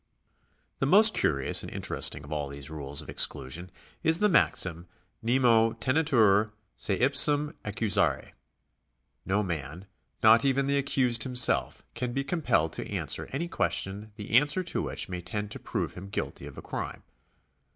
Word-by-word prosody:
The 135 - 0
most 215 +7 +7
curious 70 -2 0
and - - -7
interesting - - 0
of 75 - -13
all 75 -2 -3
these 70 +1 -7
rules 70 -2 -1
of - - -16
exclusion 80 +8 0 0.3
is 160 0 +5
the 210 +3 +2
maxim. 95 - +1 0.3
Nemo 115 -2 +2
tejietur 115 -8 +2 0.2
se 100 - 0
ipsum 145 +3 +3
accusare. 100 -8 0 1.0
No 100 +3 0
man, 85 0 -6 0.4
not 110 +1 +6
even 135 0 +1
the 140 0 +1
accused 125 -4 +1
himself, 125 0 +1
can 125 -1 -4
be 135 - -2
compelled 135 - -1
to - - -6
answer - - -2
any 160 +6 -3
question 105 - -1
the 105 -2 -9
answer 145 +9 +3
to 180 - -2
which - - -3
may 90 -1 -6
tend 105 +4 -5
to - - -5
prove - - -4
him 95 +2 -10
guilty 70 -9 -5
of - - -13
a - - -9
crime. - - -6
110 Hz, 155 wpm, -27 LUFS, 90-140 Hz, 1.0 s, most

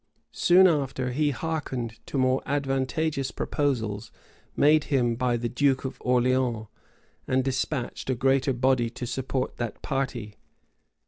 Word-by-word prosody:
[*] - - -45
Soon 180 +2 +5
after, 135 -6 +1
he 150 +4 +1
hearkened 135 -6 -3
to - - -3
more 130 0 +2
advantageous 135 +1 -1
proposals 115 -7 -2 0.4
made 150 +1 +4
him 120 -5 +1
by 125 0 0
the 120 +1 -2
duke 135 +2 +1
of 130 - -4
Orleans, 125 -2 +1 0.6
and 130 0 +2
despatched 130 0 -2
a 130 - +2
greater 135 +2 +2
body 125 -1 +2
to 120 +2 -6
support 130 +1 -3
that 120 -3 -4
party. 120 -6 -3
130 Hz, 135 wpm, -26 LUFS, 120-140 Hz, 0.6 s, Soon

